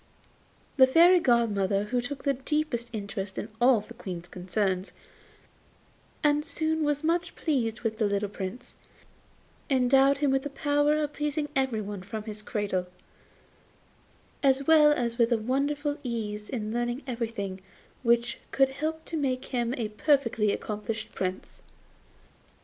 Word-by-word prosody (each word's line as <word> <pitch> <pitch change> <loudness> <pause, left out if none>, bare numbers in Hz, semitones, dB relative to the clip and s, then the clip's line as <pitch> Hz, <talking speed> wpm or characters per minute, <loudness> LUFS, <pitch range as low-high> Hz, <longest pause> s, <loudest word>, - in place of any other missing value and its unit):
The 260 -1 +8
Fairy 345 +6 +6
godmother, 210 - +2
who 245 +4 -1
took 270 +3 -6
the 280 - +2
deepest 270 -3 -2
interest 200 -3 -5
in 215 - -4
all 245 -3 +5
the 225 - -12
Queen's 180 -7 -7
concerns, 185 +1 -2 1.3
and 295 0 +3
who 315 +1 -1
was 295 -1 0
much 340 +2 0
pleased 235 -8 -1
with 220 -2 -2
the 215 - +3
little 200 0 0
Prince, 195 +3 -7 0.9
endowed 270 +1 +4
him 280 -1 +1
with 270 0 +2
the 290 - -5
power 290 +1 +2
of 300 -1 -1
pleasing 295 0 -2
everybody 215 -7 -1
from 210 +3 -6
his 215 -1 -7
cradle, 200 -4 -2 1.5
as 275 0 +3
well 305 -1 +7
as 240 -4 -1
with 235 +1 +4
a 235 - +4
wonderful 285 +5 -1
ease 215 -4 -4
in 220 -4 -3
learning 240 +3 -2
everything 225 -6 -4 0.4
which 235 -1 +2
could 270 -1 +3
help 315 +4 -4
to 335 - -5
make 260 -4 -1
him 240 -1 0
a 225 -3 -2
perfectly 230 -3 +2
accomplished 215 +2 -4
Prince. 185 0 -4
240 Hz, 140 wpm, -28 LUFS, 210-285 Hz, 1.5 s, The